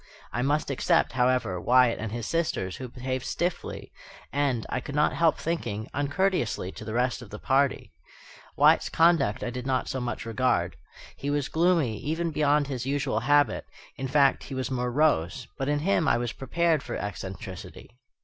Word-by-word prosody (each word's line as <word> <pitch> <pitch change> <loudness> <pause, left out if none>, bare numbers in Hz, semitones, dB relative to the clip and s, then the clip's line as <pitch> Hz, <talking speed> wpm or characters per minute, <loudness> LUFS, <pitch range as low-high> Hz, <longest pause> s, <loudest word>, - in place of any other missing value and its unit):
I 125 - -1
must 145 +2 0
except, 135 - +2
however, 125 -8 +1
Wyatt 125 +1 +4
and 115 -1 -4
his 120 0 -4
sisters, 155 - -1
who 130 - -6
behaved 130 +1 -4
stiffly, 175 0 -3 0.4
and, 135 -5 0
I - - -2
could 140 +2 -7
not 150 0 +3
help 165 -2 +3
thinking, 115 -10 -3
uncourteously, 145 - 0
to - - -10
the 110 +1 -5
rest 125 +1 0
of 120 - -11
the 105 - -7
party. 135 +4 +1 0.7
Wyatt's - - +5
conduct 165 -11 +3
I 120 - -2
did 125 +1 -5
not 130 -1 0
so 130 - -3
much 120 -1 -4
regard. 125 +3 0 0.4
He 140 - -3
was 145 -1 0
gloomy, 160 - +2
even 165 +4 -2
beyond 150 -1 +2
his 130 -2 -4
usual 140 -5 0
habit, 145 +4 +2 0.3
in 135 - -4
fact, 140 0 +3
he 135 - -6
was 130 0 -3
morose; 125 - +1
but 135 +1 -1
in 145 - +2
him 170 +1 +1
I - - +4
was 120 -1 -2
prepared 165 +2 +1
for 120 - -5
eccentricity. 100 +3 -7
130 Hz, 175 wpm, -27 LUFS, 120-150 Hz, 0.7 s, Wyatt's